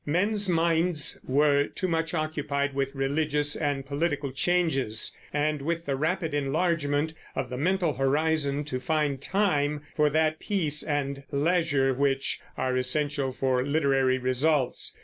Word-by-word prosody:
Men's 200 +6 +1
minds 165 -2 +2
were 145 +1 +3
too 185 - -3
much 165 0 -1
occupied 145 -3 -2
with 135 0 -2
religious 145 +2 0
and 145 -3 -2
political 145 -1 -2
changes 135 -7 0 0.2
and 150 0 0
with 170 +3 -2
the 140 - -1
rapid 160 +2 -1
enlargement 145 +1 0 0.2
of 130 -2 -3
the 125 - -3
mental 175 +2 +1
horizon 145 +2 +1
to 130 -3 -4
find 150 -1 -1
time 150 -6 0
for 150 -1 +3
that 155 +1 +1
peace 160 -8 +1
and 140 -2 -2
leisure 145 -3 +2
which 135 +1 0 0.2
are 130 0 -1
essential 140 +1 +1
for 130 -1 0
literary 135 -3 +2
results. 130 +2 0
145 Hz, 135 wpm, -27 LUFS, 135-160 Hz, 0.2 s, were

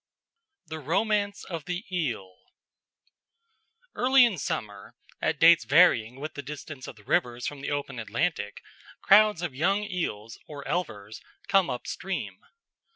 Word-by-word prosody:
The 160 -1 -7
Romance 200 +6 0
of 165 -5 -6
the 180 +5 -4
Eel 110 - -3 1.6
Early 260 0 +5
in 205 -8 -1
summer, 105 -6 -5 0.3
at - - 0
dates 165 -3 +7
varying 125 -3 +4
with 155 +2 -6
the 145 - -6
distance 145 -1 -8
of - - -9
the 105 - -18
rivers 120 +3 0
from 145 -2 -5
the - - -4
open 140 -3 -3
Atlantic, 110 - -2 0.4
crowds 210 -3 +5
of 170 -6 -3
young 195 +9 +1
eels 115 - -4
or 145 -2 -8
elvers 110 - -4 0.3
come 195 -2 +3
up 125 -1 -4
stream. 190 0 -5
150 Hz, 140 wpm, -27 LUFS, 120-185 Hz, 1.6 s, dates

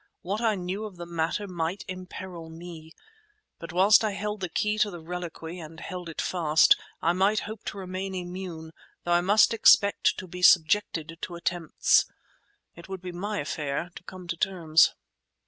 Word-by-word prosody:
What 200 +5 -2
I 225 -2 +2
knew 190 +3 -4
of 205 -3 -8
the 175 0 -7
matter 170 +4 -2
might 180 +2 -3
imperil 185 -2 -8
me, 165 -1 -10 0.7
but 165 -1 -8
whilst 195 +6 +5
I 215 -2 0
held 210 +1 -3
the 185 -2 -3
key 210 +5 0
to 210 - +3
the 175 -3 -8
reliquary, 175 0 -6
and 160 0 -10
held 180 -1 -6
it 165 - -8
fast, 160 -4 +4 0.3
I 170 - +3
might 195 +4 +2
hope 215 0 -8
to - - -5
remain 190 0 -5
immune 175 -3 -6 0.3
though 175 - -2
I 175 - +4
must 205 +5 +4
expect 205 -2 +5
to - - -6
be 180 0 -9
subjected 165 -2 +3
to 175 - -5
attempts. 170 -1 +2 0.7
It 170 +2 -13
would 190 -1 -6
be 180 - -5
my 205 +4 -3
affair 150 +3 -3
to - - -10
come 185 -1 -10
to 170 - -1
terms. 170 -3 +3
180 Hz, 180 wpm, -27 LUFS, 165-195 Hz, 0.7 s, whilst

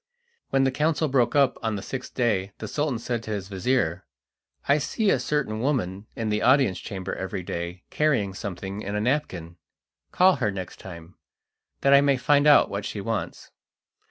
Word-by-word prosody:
When 135 - +2
the 135 - +2
council 155 +3 +1
broke 125 -3 +1
up 140 -3 +3
on 110 -2 -1
the 100 - -5
sixth 130 -1 -6
day 100 -6 0
the 110 - -6
Sultan 145 +2 -1
said 120 0 -3
to 110 - -10
his 100 -3 -4
vizir: 95 -3 0 0.6
"I 140 +2 +4
see 200 +7 0
a - - +2
certain 125 -4 -1
woman 110 -7 -1
in 110 -1 -2
the 105 0 0
audience 130 -8 +3
chamber 95 -1 -5
every 95 0 -4
day 85 +1 -5
carrying 130 -11 +1
something 95 +1 -6
in 100 0 -4
a - - 0
napkin. 105 - -2 0.5
Call 185 -1 +4
her 120 -6 0
next 95 -3 -6
time, 85 -1 -11 0.6
that 140 +1 +4
I 140 - +8
may 140 -1 +3
find 145 +3 +3
out 145 - +7
what 100 +1 -4
she 105 - -5
wants." 110 +1 -4
110 Hz, 185 wpm, -25 LUFS, 95-140 Hz, 0.6 s, I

